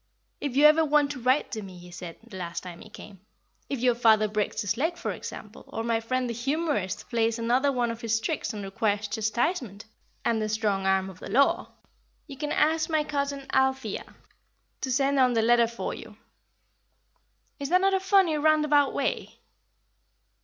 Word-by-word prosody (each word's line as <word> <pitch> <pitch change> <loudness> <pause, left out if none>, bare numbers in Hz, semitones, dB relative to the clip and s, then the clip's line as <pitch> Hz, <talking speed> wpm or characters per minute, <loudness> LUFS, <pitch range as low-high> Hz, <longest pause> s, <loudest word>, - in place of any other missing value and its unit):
'If 285 -3 -4
you 290 +2 +5
ever 310 +2 +7
want 295 -1 +2
to 275 - -6
write 255 +4 +1
to 220 - -4
me,' 190 -3 -10
he 175 0 -13
said, 175 -1 -8
the 235 - -12
last 170 -2 -5
time 175 -2 -9
he 220 - -12
came, 205 -2 -12 0.5
'if 275 - -2
your 250 -1 +4
father 220 -2 +4
breaks 210 0 -2
his 205 0 -1
leg, 325 +7 -1
for - - -3
example, - - -9
or 225 - -4
my 230 -1 +1
friend 255 +2 -1
the 235 - -3
humourist 265 - -2
plays 230 -1 +1
any 230 0 -2
of 245 -3 +1
his 225 -1 0
tricks 275 +5 -2
and 210 -3 -6
requires 205 +1 -1
chastisement, 220 - -2 0.4
and 230 -2 +1
the 215 - -1
strong 205 -3 0
arm 190 0 +2
of 190 -2 -11
the - - -8
law, 275 +3 +2 0.5
you 280 - -10
can 295 +2 -4
ask 315 +1 +2
my 310 -1 +2
cousin 280 -2 -3
Althea 265 0 0 0.7
to 260 - -2
send 275 +2 +2
on 255 -1 +4
the 225 -1 +2
letter 235 0 +4
for 235 +1 -5
you.' - - -11 1.4
Is 280 -1 -4
that 365 +1 +4
not 390 0 +3
a 385 - +3
funny, 380 -4 +3
roundabout 300 -2 +3
way?" - - -2
240 Hz, 185 wpm, -27 LUFS, 215-285 Hz, 1.4 s, ever